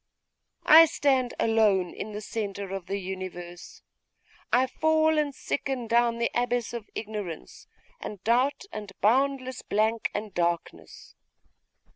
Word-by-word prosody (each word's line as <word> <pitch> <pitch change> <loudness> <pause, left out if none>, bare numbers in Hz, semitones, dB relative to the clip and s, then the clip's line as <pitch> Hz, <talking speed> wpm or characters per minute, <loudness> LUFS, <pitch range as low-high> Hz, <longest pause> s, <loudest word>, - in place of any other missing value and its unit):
I 320 +2 +9
stand 265 -5 +1
alone 210 -5 +2
in 215 - -6
the 210 0 -6
centre 200 -3 -5
of 190 -2 -6
the 195 +2 -2
universe! 185 -2 -8 0.7
I 250 +2 +4
fall 315 +3 +2
and 290 -2 -1
sicken 270 -4 -3
down 235 0 +2
the 235 0 0
abyss 245 -1 -1
of 235 -3 -7
ignorance, 205 -7 -6 0.3
and 205 - -7
doubt, 250 - +2
and 210 -2 -6
boundless 260 +3 +1
blank 220 +2 0
and 210 0 -4
darkness! 170 -1 -3
225 Hz, 125 wpm, -27 LUFS, 200-255 Hz, 0.7 s, I